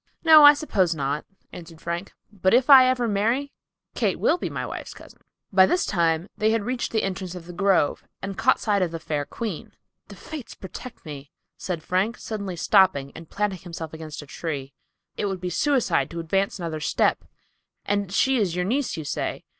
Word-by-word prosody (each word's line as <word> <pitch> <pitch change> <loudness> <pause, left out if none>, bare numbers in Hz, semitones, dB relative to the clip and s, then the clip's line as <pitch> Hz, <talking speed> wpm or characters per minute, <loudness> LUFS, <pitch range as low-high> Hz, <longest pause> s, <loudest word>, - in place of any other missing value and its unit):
"No, 315 -2 +8
I 290 0 +10
suppose 190 - 0
not," 145 +1 -2 0.3
answered 165 -2 -11
Frank. 170 +3 -4 0.2
"But 190 +1 +2
if 260 +3 +3
I 260 -2 +10
ever 250 -2 +1
marry, 230 +7 0 0.4
Kate - - 0
will 355 - +2
be - - -3
my - - -4
wife's - - -7
cousin." - - -15 0.3
By 190 -1 +6
this 360 - +1
time 170 -1 +1
they 215 - +1
had 225 -1 +1
reached 245 +2 -3
the 220 - 0
entrance 185 -1 -4
of 175 -2 -9
the 175 - -9
grove 190 -4 +1 0.2
and 195 0 -5
caught 235 +6 +2
sight 205 -3 +1
of 180 - +1
the 165 0 -6
fair 150 -3 -3
queen. 205 +3 -6 0.3
"The - - -11
fates 305 -6 -9
protect 210 +5 -10
me!" 145 -2 -8 0.3
said 170 -4 -5
Frank, 195 +7 0
suddenly 200 -4 -5
stopping 175 -7 +3
and 165 -1 -11
planting 205 -3 -2
himself 165 -3 -8
against 155 -2 -8
a - - -12
tree. 140 -3 -5 0.4
"It 205 - -1
would 190 -2 -3
be 180 0 -4
suicide 205 - +1
to 170 - -6
advance 195 +6 -1
another 165 -4 -4
step. 150 - +1 0.6
And 200 -2 -1
she 265 +6 +2
is 190 -7 0
your 180 0 -1
niece, 255 +1 -1
you 160 - -4
say. - - -3
190 Hz, 195 wpm, -24 LUFS, 165-225 Hz, 0.6 s, I